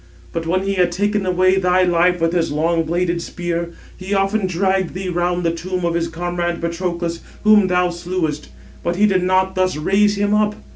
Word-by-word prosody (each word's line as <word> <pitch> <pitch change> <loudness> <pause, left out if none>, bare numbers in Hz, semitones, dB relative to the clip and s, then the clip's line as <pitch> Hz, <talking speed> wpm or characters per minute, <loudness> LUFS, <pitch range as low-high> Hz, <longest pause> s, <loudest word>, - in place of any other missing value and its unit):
But 165 -1 -3
when 185 +3 +1
he 195 0 -1
had 180 -2 +2
taken 205 +2 -1
away 185 +1 +3
thy 180 0 +3
life 180 0 +2
with 165 +1 +1
his 170 -3 0
long 165 +3 +1
bladed 170 +1 -1
spear, 170 -1 -3 0.3
he 190 +2 -3
often 195 +1 +1
dragged 190 0 0
thee 185 0 -4
round 175 0 -1
the 165 - +1
tomb 180 +1 -3
of 170 - 0
his 170 0 0
comrade 175 +1 -3
Patroclus, 170 0 -3 0.2
whom 210 -2 +5
thou 180 -1 +1
slewest; 175 - -3 0.3
but 170 - -1
he 205 +3 +3
did 190 -3 +2
not 185 +1 +1
thus 185 -3 0
raise 205 +6 +2
him 205 +1 0
up. 210 0 +2
180 Hz, 195 wpm, -19 LUFS, 170-190 Hz, 0.3 s, whom